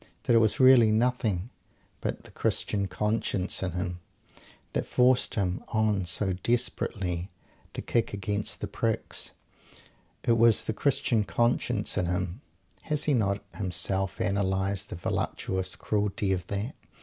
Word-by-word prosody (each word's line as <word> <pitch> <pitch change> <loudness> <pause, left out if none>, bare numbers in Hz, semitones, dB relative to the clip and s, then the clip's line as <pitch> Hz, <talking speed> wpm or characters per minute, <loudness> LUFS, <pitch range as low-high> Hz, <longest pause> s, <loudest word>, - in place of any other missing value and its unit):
that - - +2
it - - +7
was 110 -2 +3
really 130 -4 +7
nothing 110 -3 0 0.5
but - - -4
the - - -14
"Christian 100 -2 0
conscience" 105 0 -1
in 95 -3 -2
him 90 0 -3 0.7
that - - -1
forced 125 0 +3
him 95 -3 -1
on 110 -4 +1
so 95 +2 0
desperately 95 -4 -1 0.4
to - - -5
kick 115 -2 0
against 100 +1 -3
the - - -2
pricks. - - -1 0.9
It 115 -1 +2
was 115 -1 +5
the 110 - -2
"Christian 135 -3 +1
conscience" 120 -1 0
in 90 - 0
him 90 +4 -2 0.4
has 150 -1 0
he 150 - +2
not 100 -5 +1
himself 95 0 +2
analysed 95 0 0
the - - -5
voluptuous 95 +1 -2
cruelty 100 +1 -1
of 90 -1 -4
that? 100 +6 -3
100 Hz, 135 wpm, -28 LUFS, 95-115 Hz, 0.9 s, it